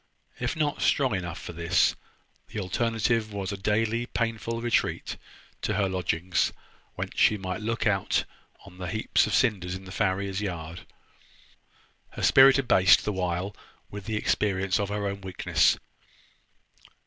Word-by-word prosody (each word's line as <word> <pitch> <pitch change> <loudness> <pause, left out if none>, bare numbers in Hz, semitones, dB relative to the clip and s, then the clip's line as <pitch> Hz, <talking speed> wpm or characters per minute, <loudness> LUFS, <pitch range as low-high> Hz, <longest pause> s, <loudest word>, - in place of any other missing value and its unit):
If 120 0 -2
not 150 -2 -1
strong 130 -5 +2
enough 85 -3 -3
for - - -8
this, 85 +1 +2 0.5
the - - -5
alternative 115 +2 0
was 100 -1 -4
a - - -3
daily 110 +4 0
painful 115 -1 -2
retreat 120 0 0 0.5
to - - -1
her 100 -2 +2
lodging, 90 -1 -2 0.6
whence - - -5
she 105 - +5
might 95 +1 -4
look 115 +2 -2
out 100 -3 +1 0.4
on 90 -2 -14
the 90 - -4
heaps 110 0 +1
of - - 0
cinders 95 -7 +1
in 95 0 -9
the 95 - -10
farrier's 100 0 -1
yard, 85 -4 -5 1.3
her - - -6
spirit 135 +1 +7
abased 100 -8 +5
the 105 - -1
while 90 +1 -2 0.4
with 100 -1 -7
the 110 - -2
experience 95 -2 +1
of 100 -1 -1
her 105 0 -2
own 100 0 -3
weakness. 95 -2 +2
100 Hz, 150 wpm, -27 LUFS, 95-115 Hz, 1.3 s, spirit